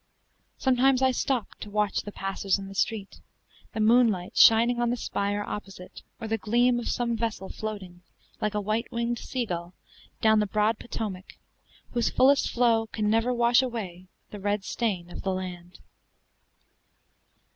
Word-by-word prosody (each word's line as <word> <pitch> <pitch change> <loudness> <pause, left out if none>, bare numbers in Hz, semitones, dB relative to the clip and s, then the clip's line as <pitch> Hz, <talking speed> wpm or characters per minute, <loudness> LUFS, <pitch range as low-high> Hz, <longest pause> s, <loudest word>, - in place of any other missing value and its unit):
Sometimes 265 0 +3
I 260 - +5
stopped 255 -2 -2
to 210 - -7
watch 210 -1 0
the 205 - -8
passers 195 0 -1
in 195 -1 -7
the 195 - -9
street, 200 +1 -2 0.5
the - - -4
moonlight 215 -5 +3
shining 235 +2 +6
on 240 - +2
the 245 - -1
spire 205 -2 -2
opposite, 195 -3 -8 0.2
or 225 - -5
the 225 0 -1
gleam 240 +4 +2
of 240 - -4
some 235 -1 0
vessel 225 -4 -3
floating, 195 -5 -7 0.4
like 210 0 -1
a 210 - 0
white 215 +3 -2
winged 235 0 -1
sea 255 -3 -3
gull, 175 -2 -5 0.4
down 220 -1 +4
the 210 - +1
broad 215 +2 +1
Potomac, 200 -5 -6 0.5
whose 240 -2 +1
fullest 275 +2 +4
flow 230 -2 +2
can 215 -1 -1
never 225 +3 +2
wash 240 +1 +4
away 195 -8 -5 0.2
the 210 - -7
red 205 0 -1
stain 190 -6 -2
of - - -7
the 195 - -1
land. 180 -1 -7
215 Hz, 160 wpm, -27 LUFS, 195-235 Hz, 0.5 s, shining